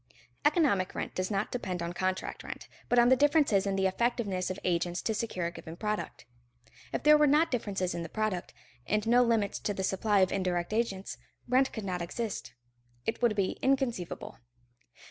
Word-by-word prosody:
Economic 290 Hz, -, +2 dB
rent -, -, -4 dB
does 185 Hz, 0 st, -2 dB
not 200 Hz, 0 st, -1 dB
depend 190 Hz, -7 st, -3 dB
on 170 Hz, +1 st, -3 dB
contract 185 Hz, +1 st, -2 dB
rent, -, -, -8 dB, 0.2 s
but 245 Hz, -, +3 dB
on 240 Hz, 0 st, +6 dB
the 260 Hz, -, +7 dB
differences 285 Hz, -8 st, +3 dB
in 195 Hz, -, 0 dB
the 190 Hz, 0 st, +1 dB
effectiveness 200 Hz, -2 st, 0 dB
of 185 Hz, -, -3 dB
agents 175 Hz, 0 st, 0 dB
to 220 Hz, -, -1 dB
secure 210 Hz, -5 st, -2 dB
a 170 Hz, -, -1 dB
given 165 Hz, -1 st, -9 dB
product. 210 Hz, +3 st, -4 dB, 0.7 s
If -, -, -3 dB
there 300 Hz, 0 st, +7 dB
were 300 Hz, -, +5 dB
not 310 Hz, +4 st, +4 dB
differences 200 Hz, -7 st, -1 dB
in 170 Hz, -, -3 dB
the 165 Hz, -, -6 dB
product, 215 Hz, -4 st, -2 dB, 0.4 s
and 210 Hz, +1 st, +1 dB
no 240 Hz, +2 st, +5 dB
limits 225 Hz, -4 st, +1 dB
to 205 Hz, -, -2 dB
the 190 Hz, -, -2 dB
supply 195 Hz, +1 st, +2 dB
of 185 Hz, -, +3 dB
indirect 180 Hz, -1 st, -1 dB
agents, 210 Hz, -4 st, -2 dB, 0.3 s
rent 260 Hz, +2 st, +3 dB
could 220 Hz, -3 st, -6 dB
not 180 Hz, -2 st, -2 dB
exist; 215 Hz, +5 st, -4 dB, 0.5 s
it 225 Hz, -, -2 dB
would 235 Hz, -3 st, +3 dB
be 195 Hz, -2 st, -1 dB
inconceivable. 260 Hz, -10 st, -1 dB
205 Hz, 185 wpm, -30 LUFS, 185-240 Hz, 0.7 s, the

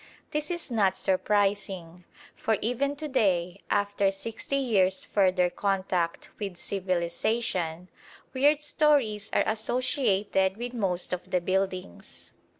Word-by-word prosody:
This 300 Hz, +1 st, -1 dB
is 345 Hz, -6 st, -2 dB
not 205 Hz, -5 st, +2 dB
surprising, 190 Hz, -3 st, 0 dB, 0.3 s
for 220 Hz, -1 st, 0 dB
even 270 Hz, +5 st, 0 dB
to 305 Hz, +1 st, -5 dB
day, 190 Hz, -8 st, +1 dB
after 205 Hz, -1 st, +2 dB
sixty 225 Hz, +7 st, -4 dB
years' 200 Hz, -9 st, +2 dB
further 185 Hz, -3 st, +2 dB
contact 185 Hz, -4 st, -1 dB
with 195 Hz, -4 st, -4 dB
civilisation, 180 Hz, -1 st, -1 dB, 0.5 s
weird 290 Hz, +3 st, +3 dB
stories 280 Hz, -9 st, +2 dB
are -, -, +3 dB
associated 215 Hz, -4 st, +1 dB
with 245 Hz, +1 st, -5 dB
most 185 Hz, -6 st, 0 dB
of 180 Hz, -, -5 dB
the 180 Hz, -, +2 dB
buildings. 185 Hz, -, -3 dB
200 Hz, 115 wpm, -28 LUFS, 185-235 Hz, 0.5 s, weird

